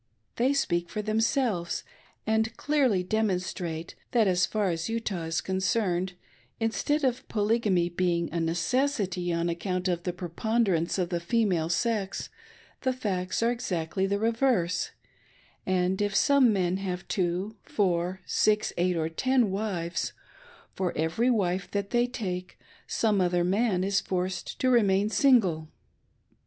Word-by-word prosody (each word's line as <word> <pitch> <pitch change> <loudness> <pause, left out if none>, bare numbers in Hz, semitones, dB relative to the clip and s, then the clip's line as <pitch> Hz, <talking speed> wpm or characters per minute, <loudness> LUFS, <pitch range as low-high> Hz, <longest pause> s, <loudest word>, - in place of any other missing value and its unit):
They 255 +3 +3
speak 175 -11 0
for 210 +3 -3
themselves, 215 -4 0 0.4
and 220 +1 0
clearly 265 -11 +2
demonstrate 180 -5 -2 0.2
that, 230 -4 +4
as 180 -1 +3
far 210 -4 0
as 165 +4 -3
Utah 215 -7 -2
is 165 0 -1
concerned, 190 -1 0 0.5
instead 230 +7 0
of 255 -2 0
Polygamy 210 -5 +1
being 175 -1 0
a 170 - 0
necessity 180 - 0
on 170 0 0
account 180 +2 -2
of 175 -2 0
the 180 - -2
preponderance 180 0 0
of 180 -2 0
the 175 -2 -1
female 175 -3 +1
sex, 205 +1 -1 0.5
the 260 -1 +1
facts 195 -5 -2
are 235 - +3
exactly 190 -6 -2
the 200 +1 0
reverse; 225 -5 +1 0.8
and 185 +1 +1
if 205 -1 0
some 280 -3 +5
men 185 -2 +1
have 185 -2 -4
two, 185 +4 -1
four, 185 -1 -1
six, 215 0 +2
eight 175 0 +1
or 160 -1 0
ten 245 +5 +1
wives, 190 -4 -2 0.6
for 185 -2 -2
every 160 +11 +1
wife 195 -5 0
they 205 +4 0
take 185 -7 -5 0.3
some 215 -3 +1
othei' 175 -1 +2
man 195 0 +1
is 195 0 +2
forced 185 0 -3
to 255 - +3
remain 205 -3 +3
single. 210 - +3
190 Hz, 135 wpm, -28 LUFS, 175-225 Hz, 0.8 s, some